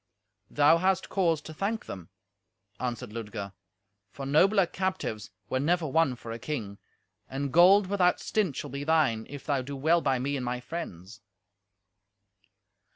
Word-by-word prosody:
"Thou 150 +3 +5
has 190 +1 +2
cause 170 -6 0
to 155 - -9
thank 205 +7 -2
them," 90 -3 -8 0.7
answered 125 -2 -4
Ludger, 105 -3 -6 0.6
"for 135 +6 -8
nobler 190 +8 +4
captives 185 - -3 0.2
were 130 - -1
never 170 +4 +1
won 155 -2 +2
for 115 -1 -9
a 115 - -5
king; 110 -8 -5 0.5
and 135 0 -3
gold 190 +4 +7
without 185 -2 +2
stint 195 -10 -1
shall 145 - -5
be 140 +1 -4
thine, 145 -8 +2
if 145 -1 -9
thou 140 -3 0
do 140 +2 -6
well 160 +5 +3
by 135 -4 +1
me 140 +3 -2
and 130 - -3
my 125 0 -2
friends." 120 - -7
145 Hz, 155 wpm, -28 LUFS, 125-170 Hz, 0.7 s, gold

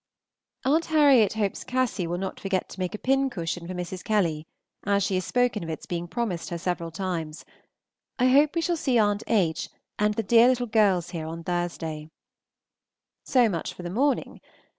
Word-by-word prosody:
Aunt 310 +5 +3
Harriet 280 - +5
hopes 210 -3 -2
Cassy 250 -8 -1
will 175 +1 -2
not 190 +1 -5
forget 195 -2 -1
to - - -11
make 185 +2 -2
a - - -4
pincushion 215 -11 -1
for 185 - -5
Mrs. 180 +1 -5
Kelly, 170 -8 0 0.4
as 200 -1 +2
she 190 - -1
has 185 0 0
spoken 245 -5 +1
of 165 - -6
its 160 - -5
being 175 0 -4
promised 205 -4 -3
her 170 - -3
several 170 -1 -3
times. 165 -3 -4 0.7
I 255 0 +3
hope 290 +5 +4
we 335 - +1
shall 345 +1 0
see 260 -5 +1
Aunt 205 -1 +2
H. 170 -8 +1 0.3
and 210 0 +2
the 225 - -1
dear 230 +3 +6
little 250 -1 +2
girls 205 -6 +2
here 160 -2 -5
on 165 +1 -6
Thursday. 165 -3 -3 1.2
So 250 -3 +4
much 170 -6 -3
for 180 - -9
the 175 - -5
morning. 270 +6 0
195 Hz, 185 wpm, -26 LUFS, 175-245 Hz, 1.2 s, dear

